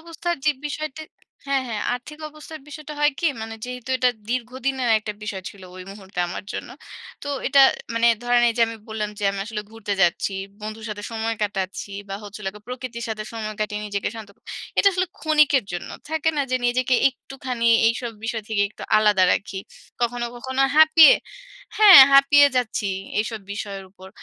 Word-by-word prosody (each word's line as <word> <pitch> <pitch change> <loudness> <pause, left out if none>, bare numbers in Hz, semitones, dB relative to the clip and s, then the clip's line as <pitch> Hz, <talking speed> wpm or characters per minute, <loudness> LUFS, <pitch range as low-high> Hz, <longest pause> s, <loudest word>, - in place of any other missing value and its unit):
অবস্থার 335 +1 -4
যেই 300 -1 +3
বিষয়টা 310 0 -5 0.4
হ্যাঁ, 275 -1 +1
হ্যাঁ 215 -3 -3
আর্থিক 275 +5 -9
অবস্থার 305 +1 -11
বিষয়টা 305 0 -9
হয় 295 0 +4
কি? 340 - +1 0.2
মানে 225 0 -6
যেহেতু 250 0 -8
এইটা 250 -1 +3 0.2
দীর্ঘদিনের 255 +1 -2
একটা 215 0 -6
বিষয় 205 -3 -5
ছিলো 190 -2 -13
ঐ - - -10
মুহূর্তে 195 -2 -12
আমার 180 - -6
জন্য। - - -6 0.5
তো 285 - -6 0.2
এটা 280 0 +5 0.3
মানে 230 0 +2 0.2
ধরেন 245 0 +3
এইযে 230 0 +1
আমি 230 - -7
বললাম 215 -1 -3
যে, 205 - -3
"আমি 200 - -6
আসলে 215 -2 -5
ঘুরতে 220 -2 -5
যাচ্ছি, 175 +3 +1 0.3
বন্ধুর 215 +1 -7
সাথে 205 -1 -6
সময় 225 0 -2
কাটাচ্ছি 200 -1 -3 0.2
বা 195 - -4
হচ্ছে 205 0 -9
হলো 190 -2 -3
গিয়ে 210 0 -14
প্রকৃতির 250 -2 -6
সাথে 215 -1 -4
সময় 215 -2 -5
কাটিয়ে 210 0 -2
নিজেকে 200 -1 -2
শান্ত 220 -2 -9
ক" - - -36 0.4
এটা 400 - +6
আসলে 370 0 0
ক্ষণিকের 300 -5 +3
জন্য। 175 - -5 0.2
থাকে 320 0 0
না? 285 - +2
যে 255 - +2
নিজেকে 255 +1 +1
একটুখানি 260 -2 -6 0.2
এইসব 230 0 -3
বিষয় 225 -1 -3
থেকে 215 -2 +1
একটু - - -12
আলাদা 210 -3 +4
রাখি। 195 -1 -3 0.4
কখনো, 240 0 -1
কখনো 260 +2 -3 0.2
হাঁপিয়ে 315 -1 +8 0.6
হ্যাঁ 415 -6 +10
হাঁপিয়ে 280 +1 +7
যাচ্ছি 220 -4 -1 0.3
এইসব 220 0 -2
বিষয়ের 200 -1 -6
উপর। 190 0 -14
235 Hz, 180 wpm, -23 LUFS, 210-275 Hz, 0.6 s, হ্যাঁ